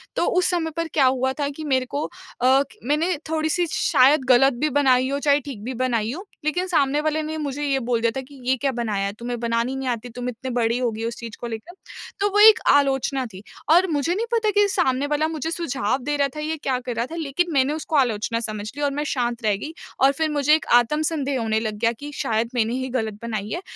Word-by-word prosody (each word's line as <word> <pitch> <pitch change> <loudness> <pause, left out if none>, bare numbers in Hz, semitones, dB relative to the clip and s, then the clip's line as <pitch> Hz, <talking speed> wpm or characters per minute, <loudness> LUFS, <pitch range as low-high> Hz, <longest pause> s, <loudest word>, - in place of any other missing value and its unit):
तो - - +1
उस 365 - +3
समय 335 -3 -1
पर 330 0 -1
क्या 275 -3 +4
हुआ 260 0 +2
था 285 - 0
कि 300 +2 -8
मेरे 260 -4 +1
को 285 +3 -3
अ, - - -9 0.3
क 265 +2 +5 0.2
मैंने 300 +8 +1
थोड़ी-सी 315 +2 0
शायद 270 +2 +4
ग़लत 270 +2 +6
भी 305 - +3
बनाई 260 -2 +3
हो, 280 +1 -1
चाहे 285 0 +3
ठीक 255 -7 -8
भी 255 +3 -4
बनाई 235 -3 0
हो, 370 +7 -7 0.2
लेकिन 355 +5 0
सामने 295 -4 +2
वाले 310 0 0
ने 315 +1 -4
मुझे 290 -1 -3
ये 275 -2 +1
बोल 235 -1 -1
दिया 230 0 +2
था - - -2
कि 280 -1 -14
ये 265 - +4
क्या 275 +2 0
बनाया 215 -5 -2
है, 200 - -3
तुम्हें 240 0 -4
बनानी 230 0 0
नहीं 265 -1 -4
आती, 240 0 -3
तुम 245 +1 -5
इतनी 250 +2 -6
बड़ी 235 -1 +1
हो 245 - +1
गई 220 0 -6
हो 230 - -1
उस 235 - -7
चीज़ 230 -2 -7
को 240 - -5
लेकर। 235 +10 -7 0.5
तो 405 +1 +2
वो 415 - +2
एक 440 +1 +8
आलोचना 270 -1 +2
थी 190 - -9 0.3
और 355 +4 +5
मुझे 315 +1 0
नहीं 445 +4 -1
पता 450 -2 +2
कि 410 0 +4
सामने 280 -8 +1
वाला 300 +1 +1
मुझे 320 0 -3
सुझाव 275 -10 -1
दे 295 +3 -1
रहा 280 - +2
था - - -5
या 315 +1 -2
क्या 260 -2 0
कर 245 - -3
रहा 235 +2 0
था - - -5
लेकिन 335 +2 -1
मैंने 275 +1 +2
उसको 315 0 -4
आलोचना 230 -4 +1
समझ 215 -3 -5
ली 290 - -6
और 285 - +1
मैं 295 - -2
शांत 240 -2 -2
रह 210 -2 +2
गई 315 +2 -6 0.3
और 270 +1 +6
फ़िर 310 +2 -1
मुझे 295 +1 +4
एक 315 - -3
आत्मसंदेह 285 +2 +2
होने 220 -1 +1
लग 215 -1 -3
गया 230 0 +2
कि 290 +1 -7
शायद 230 -3 -1
मैंने 230 0 +1
ही 260 0 -3
ग़लत 220 -4 -2
बनाई 215 -3 -3
है। 350 - -3
270 Hz, 255 wpm, -23 LUFS, 235-305 Hz, 0.5 s, एक